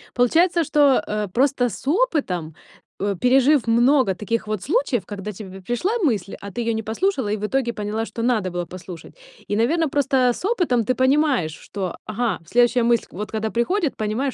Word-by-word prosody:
Получается, 335 +8 +3
что, 285 -5 +3
э, 210 -1 -2
просто 250 -1 +2
с 260 - -10
опытом, 285 - 0 0.5
э, 200 0 -1
пережив 265 +2 +4
много 240 -2 +4
таких 220 +3 -3
вот 215 -3 -2
случаев, 295 - 0
когда 205 0 -6
тебе 190 -1 -10
пришла 240 - -1
мысль, 205 - 0
а 200 0 -8
ты 240 - -4
её 230 0 0
не 220 0 -3
послушала 260 - -1
и 215 - 0
в 210 - -3
итоге 240 0 -1
поняла, 215 +2 -3
что 230 - -6
надо 220 -7 0
было 175 0 -3
послушать. 180 -1 -10 0.3
И, 205 - -1
наверно, 310 +8 +1
просто 275 -1 +1 0.2
с 365 - -7
опытом 335 - +1
ты 255 - +1
понимаешь, 260 - +2
что, 190 -1 -6
ага, 215 -2 -2
следующая 240 +4 +3
мысль, 235 -1 +2
вот, 205 +3 -6
когда 220 0 -2
приходит, 305 - 0
понимаешь, 225 +6 -1
235 Hz, 185 wpm, -22 LUFS, 210-275 Hz, 0.5 s, пережив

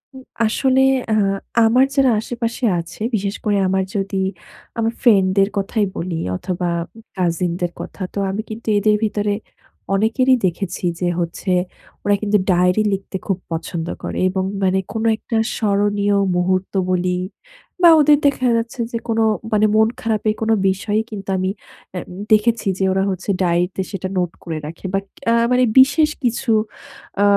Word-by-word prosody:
হুম, 260 - -11 0.2
আসলে 260 +4 +2 0.3
আ - - +3 0.5
আমার 250 +4 +4
যারা 270 -2 +4
আশেপাশে 235 +2 -3
আছে, 165 0 -9 0.2
বিশেষ 200 0 -2
করে 205 -1 +2
আমার 190 0 +1
যদি 195 0 -2 0.6
আমার 225 0 0
friend 205 -7 +5
দের 195 0 +4
কথাই 205 +2 0
বলি 170 0 -3 0.2
অথবা 180 - -3 0.5
cousin 175 -1 0
দের 175 -1 0
কথা। - - -8
তো, - - -7
আমি 195 +3 -2
কিন্তু 225 +1 -8
এদের 210 +1 +3
ভিতরে 205 -1 0 0.6
অনেকেরই 225 +6 +3
দেখেছি 180 0 -2
যে, 180 - 0
হচ্ছে 170 +2 -3 0.5
ওরা 205 0 +3
কিন্তু 210 -1 +2
ডায়েরি 180 +3 +3
লিখতে 195 0 -5
খুব 195 - 0
পছন্দ 165 0 -4 0.2
করে - - -4
এবং 190 0 -1 0.2
মানে 190 0 +2
কোনো 225 0 -1
একটা 225 - -5 0.2
স্মরণীয় 205 -1 +1 0.2
মুহূর্ত 185 +1 0 0.2
বলি 180 0 +1 0.6
বা 345 - +8
ওদের 295 0 +6
দেখা 280 -2 +2
যাচ্ছে 230 +2 -4
যে, 230 - -2
কোনো 225 -1 +1 0.3
মানে 215 0 +4
মন 220 0 +5
খারাপের 215 -1 0
কোনো 225 0 +2 0.2
বিষয়ই 205 +3 -1
কিন্তু 195 -2 -7
আমি 185 0 0 0.4
অ্যা 180 - -4 0.3
দেখেছি 220 +1 +3
যে, - - -1
ওরা 190 0 +1
হচ্ছে 190 +1 -5
ডায়েরি 175 0 +2
তে - - -1
সেটা 190 -1 -4
নোট 180 -2 0
করে 165 -2 -4
রাখে। 165 +5 -9
বাট 195 0 -1 0.3
আ - - +4 0.2
মানে 250 0 +4 0.2
বিশেষ 290 +4 +5
কিছু 240 0 0 0.7
আ - - +5
205 Hz, 160 wpm, -19 LUFS, 185-225 Hz, 0.7 s, বা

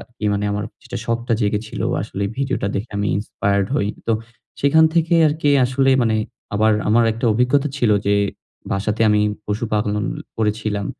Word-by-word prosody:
কি 110 - -5
মানে 100 0 -1
আমার 105 0 -2 0.2
যেটা 120 0 -6
শখটা 115 0 -1
জেগেছিল 105 +1 -2 0.2
আসলে 100 - -4
ভিডিওটা 135 -6 -1
দেখে। 105 +4 -4
আমি 100 0 0
Inspired 100 -1 -1
হই। 100 -7 +1 0.2
তো - - +3 0.5
সেখান 150 +3 +5
থেকে 170 0 +2
আরকি 150 -1 0 0.2
আসলে 135 +2 +1
মানে 115 -2 +2 0.4
আমার 110 +1 +3 0.2
আমার 115 +2 +4
একটা 115 +3 -3
অভিজ্ঞতা 125 +5 +2
ছিল 120 -5 +2 0.2
যে 100 - +3 0.6
বাসাতে 105 +3 -1
আমি 105 0 +3 0.2
পশুপালন 105 0 -1 0.3
করেছিলাম। 105 -2 -1
110 Hz, 155 wpm, -20 LUFS, 105-125 Hz, 0.6 s, সেখান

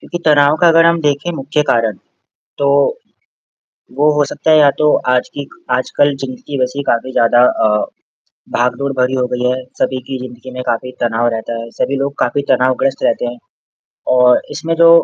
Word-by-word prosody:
क्योंकि 175 - -6
तनाव 145 -1 +4
का 175 - +6
अगर 165 0 +5
हम 170 0 +3
देखें 150 +3 -1
मुख्य, 150 +1 -1
कारण 115 -7 0 0.6
तो 140 - +1 1.3
वो 145 +2 +3
हो 145 - +4
सकता 160 - -1
है 155 - +6
या 145 -1 +6
तो 150 0 +3 0.2
आज 125 - +1
की 140 -1 -6 0.3
आजकल 145 +2 0
जिंदगी 250 - -6
वैसी 130 +3 -2
काफ़ी 120 +2 0
ज़्यादा 120 -1 +3 0.2
अ, 105 -1 +2 0.7
भागदौड़ 135 +3 -1
भरी 125 +1 +1
हो 125 -1 0
गई 125 0 -2
है। 125 - +1 0.2
सभी 130 - 0
की 135 - -4
ज़िंदगी 125 0 -10
में 125 0 -5
काफ़ी 125 +2 -2
तनाव 120 0 0
रहता 110 +1 -5
है। 115 0 -9
सभी 140 - 0
लोग 140 +1 -2
काफ़ी 145 - 0
तनावग्रस्त 130 +1 +1
रहते - - +1
हैं 120 0 -6 0.8
और 125 0 +5
इसमें 165 +1 -3
जो 165 0 +6
130 Hz, 180 wpm, -15 LUFS, 125-145 Hz, 1.3 s, का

